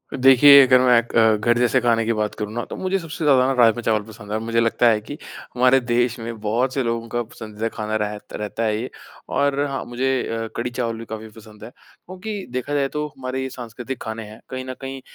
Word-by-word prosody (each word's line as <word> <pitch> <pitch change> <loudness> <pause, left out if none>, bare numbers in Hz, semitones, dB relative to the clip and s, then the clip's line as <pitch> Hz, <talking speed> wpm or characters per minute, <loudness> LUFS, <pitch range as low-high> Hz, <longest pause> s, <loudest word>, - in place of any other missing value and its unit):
देखिए, 135 +2 +8
अगर 125 0 +5
मैं 125 -2 +5
क - - -7
अ, 110 -1 +5
घर 120 +3 +2
जैसे 125 +1 +3
खाने 115 -1 +2
की 115 - +1
बात 105 -1 -2
करूँ 105 0 -5
ना, 120 +1 -3
तो - - -8
मुझे 190 +1 -1
सबसे 165 -1 -7
ज़्यादा 130 -3 +5
ना 135 - +1
राजमा 120 -2 +4
चावल 110 -2 +1
पसंद 110 -1 -13
है - - -1
और - - -4
मुझे 115 0 0
लगता 115 +1 +3
है 110 -2 +2
कि 145 +7 -8 0.4
हमारे 125 +1 +5
देश 120 0 0
में 115 -1 -6
बहुत 120 +5 0
से 135 - 0
लोगों 115 -1 -2
का 120 +1 -2
पसंदीदा 110 -1 -6
खाना 110 -1 -4
रह 105 0 -2 0.2
रहता 105 +2 -4
है 105 -1 0
ये। 125 - -5 0.4
और 140 0 +1
हाँ, 135 -1 -4
मुझे 130 +1 -1
अ, 115 0 -3
कढ़ी 120 +1 -2
चावल 120 -2 -3
भी 115 - -8
काफ़ी 110 0 -7
पसंद 110 -1 -14
है, 110 - -8
क्योंकि 195 +2 -8
देखा 130 +3 -3
जाए 140 -1 +1
तो 150 +1 -3
हमारे 130 0 -4
ये 130 - -3
सांस्कृतिक 125 +1 -7
खाने 110 0 -5
हैं, 105 +1 -12
कहीं 130 0 -5
न 130 - -5
कहीं 135 0 -6
120 Hz, 240 wpm, -22 LUFS, 110-130 Hz, 0.4 s, देखिए